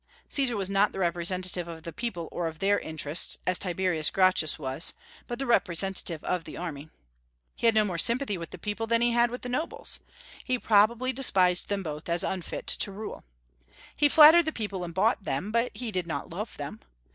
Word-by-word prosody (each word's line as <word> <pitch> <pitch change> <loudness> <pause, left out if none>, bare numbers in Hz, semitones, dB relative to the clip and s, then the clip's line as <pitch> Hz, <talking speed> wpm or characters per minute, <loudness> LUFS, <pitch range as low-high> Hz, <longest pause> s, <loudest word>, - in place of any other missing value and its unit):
Caesar 260 -5 +3
was 195 -2 -1
not 195 +1 +2
the - - -7
representative 175 0 -1
of 165 -1 -9
the 170 -1 -7
people 210 -9 -4
or 175 -1 -2
of 160 -1 -7
their 200 +2 +2
interests, 155 +1 -1
as 185 0 +1
Tiberius 180 -3 0
Gracchus 185 -5 +2
was, 135 +2 -2 0.3
but 240 - -4
the 270 - -3
representative 185 - 0
of 180 -2 -1
the - - -9
Army. 160 -3 -6 0.7
He - - +1
had 225 - +4
no 215 -1 +4
more 180 -4 -2
sympathy 235 - +2
with 165 -2 -7
the - - -8
people 215 +2 -4
than 230 +1 +2
he 240 - +3
had 240 0 +3
with 245 +1 -7
the - - -3
nobles: 335 - -2 0.4
he 255 -1 0
probably 235 +4 +3
despised 185 -9 +3
them 200 -1 -1
both, 155 0 -6
as 170 0 +1
unfit 185 -3 -4
to 200 - 0
rule. 210 +2 -7 0.7
He 290 - +4
flattered 315 +3 +8
the 315 - -1
people 205 -8 -4
and 170 - -5
bought 205 +5 +1
them, 150 +6 -3
but 235 +2 +1
he 240 -3 -4
did 185 -3 -2
not 165 - -5
love - - -6
them. - - -6
195 Hz, 205 wpm, -27 LUFS, 170-235 Hz, 0.7 s, flattered